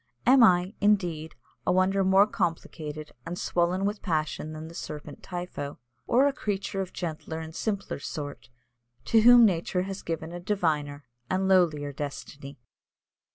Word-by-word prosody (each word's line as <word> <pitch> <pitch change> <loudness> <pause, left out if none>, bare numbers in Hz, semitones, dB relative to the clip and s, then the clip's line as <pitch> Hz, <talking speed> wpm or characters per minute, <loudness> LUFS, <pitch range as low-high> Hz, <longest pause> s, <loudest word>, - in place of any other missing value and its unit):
Am 260 +1 +7
I, 180 -2 +4
indeed, 175 -6 +1 0.3
a - - +4
wonder 190 +2 +3
more 190 +1 +6
complicated 155 -5 -4
and 170 +2 -5
swollen 180 +3 0
with 205 +1 -2
passion 155 -3 -2
than 155 +1 -7
the 165 - -11
serpent 150 -3 -7
Typho, 175 -6 -6 0.3
or 260 +4 +4
a 285 - +2
creature 200 -6 -3
of 185 - -5
gentler 160 -2 -5
and 160 0 -7
simpler 200 -1 -3
sort, 145 -1 -6 0.6
to 225 - +4
whom 240 +1 +9
nature 180 -1 +1
has 195 +1 -6
given 165 0 -4
a 175 - -6
diviner 155 -7 -1 0.2
and 190 +1 +1
lowlier 160 -6 +3
destiny?" 140 0 -7
175 Hz, 150 wpm, -27 LUFS, 155-195 Hz, 0.6 s, whom